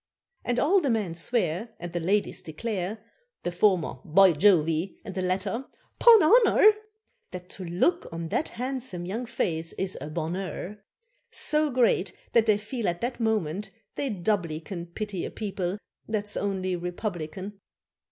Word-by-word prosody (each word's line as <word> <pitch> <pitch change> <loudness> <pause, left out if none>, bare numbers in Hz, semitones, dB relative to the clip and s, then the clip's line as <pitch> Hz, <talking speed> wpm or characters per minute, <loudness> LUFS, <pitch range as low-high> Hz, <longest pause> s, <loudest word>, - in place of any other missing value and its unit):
And 245 - -1
all 365 +9 +4
the 285 - 0
men 215 -7 0
swear, 180 +2 -1
And 175 0 -7
the 175 - -1
ladies 200 +5 +1
declare, 205 +4 -4 0.4
The 175 - -1
former 175 -6 +2
"by 190 +4 +6
Jove," 170 -1 +4 0.4
and 195 - -6
the 185 - -2
latter 190 +7 -1 0.3
"'pon 460 -6 +8
honour," 435 +3 +7 0.6
That 180 0 -9
to 185 - -5
look 195 - +1
on 165 0 -5
that 310 - 0
handsome 250 -8 -4
young 225 +7 -4
face 165 -8 -2
is 190 -1 -3
a 150 - -5
bonheur, 175 +5 -4 0.5
So 305 0 +1
great 240 -6 +2 0.2
that 230 -1 +4
they 210 -2 +5
feel 215 +2 -4
at 175 0 -1
that 240 +1 -2
moment 210 -4 -1 0.2
they 280 - -2
doubly 175 -6 -1
can 170 +1 -7
Pity 195 +1 -4
a - - -3
people 195 -3 -3 0.3
that's 210 -2 -2
only 190 -2 -1
republican. 180 +1 -5
195 Hz, 150 wpm, -27 LUFS, 175-230 Hz, 0.6 s, pon